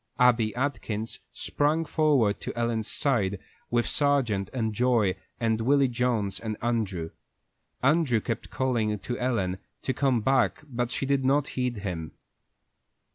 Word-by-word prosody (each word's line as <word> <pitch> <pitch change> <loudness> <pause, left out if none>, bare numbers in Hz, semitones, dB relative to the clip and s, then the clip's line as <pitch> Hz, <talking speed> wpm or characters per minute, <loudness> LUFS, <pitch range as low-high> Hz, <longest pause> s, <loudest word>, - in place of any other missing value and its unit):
Abby 120 -3 +4
Atkins 115 -5 -2
sprang 155 +3 0
forward 145 -9 +2
to - - -5
Ellen's 115 -2 0
side, 105 -8 +1 0.3
with 120 0 +1
Sargent 135 -9 +2
and 110 -4 -1
Joy 115 -5 +2 0.2
and 115 -1 +1
Willy 140 +3 +4
Jones 120 -5 0
and 110 -2 -4
Andrew. 100 -9 -1 0.7
Andrew 135 -4 +3
kept 115 +1 -4
calling 115 -5 0
to 120 +5 -5
Ellen 100 -7 0 0.2
to 130 - 0
come 130 -4 +2
back, 130 +4 +2
but 120 -3 -2
she 135 - -2
did 140 0 +1
not 140 +2 +2
heed 125 -1 -1
him. 80 -4 -4
120 Hz, 135 wpm, -27 LUFS, 110-135 Hz, 0.7 s, Abby